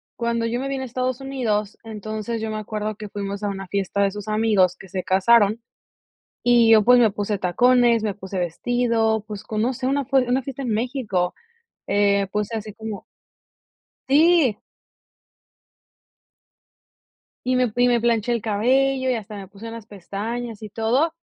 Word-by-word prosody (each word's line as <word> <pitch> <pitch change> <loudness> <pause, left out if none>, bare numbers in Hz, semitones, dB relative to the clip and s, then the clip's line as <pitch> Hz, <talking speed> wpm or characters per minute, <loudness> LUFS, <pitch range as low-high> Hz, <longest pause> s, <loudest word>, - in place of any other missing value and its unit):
Cuando 235 -1 -1
yo 235 +1 -1
me 270 - -3
vine 270 -1 -3
a - - -4
Estados 255 +1 -2
Unidos, 225 -7 -2
entonces, 215 +1 -5
yo 220 0 -3
me 215 - -3
acuerdo 215 0 -4
que 210 0 -8
fuimos 200 0 -5
a - - 0
una 195 -1 -5
fiesta 200 +1 -1
de 200 -1 +2
sus 205 0 -8
amigos 215 -4 +2
que 190 - -13
se 185 0 -4
casaron 210 +3 +3 0.8
y 240 -2 +5
yo, 220 -1 +7
pues, 250 +2 +6
me 230 -3 +5
puse 205 +1 -2
tacones, 240 +5 +3
me 210 -2 -1
puse 190 -1 -6
vestido, 225 +4 0
pues, 210 -1 -7
conoce 245 +4 -2
una 280 +1 +1
f 275 +1 -1
una 260 +1 +2
fiesta 275 +1 -6
en 245 - -2
México, 220 -6 -1 0.5
eh, 200 -1 +2
pues, 210 0 -1
así 215 -2 -5
como 220 -2 -7 1.0
Sí. 300 -4 +4 2.9
Y 255 0 +1
me 250 -3 +2
y 245 0 +4
me 240 -1 +2
planché 235 0 +1
el 235 - -1
cabello 260 +5 +1
y - - +2
hasta 215 -2 -7
me 195 - -8
puse 205 +4 -11
unas 230 -1 -9
pestañas 220 +4 -5
y 215 - -7
todo. 240 +10 +1
220 Hz, 165 wpm, -22 LUFS, 205-245 Hz, 2.9 s, yo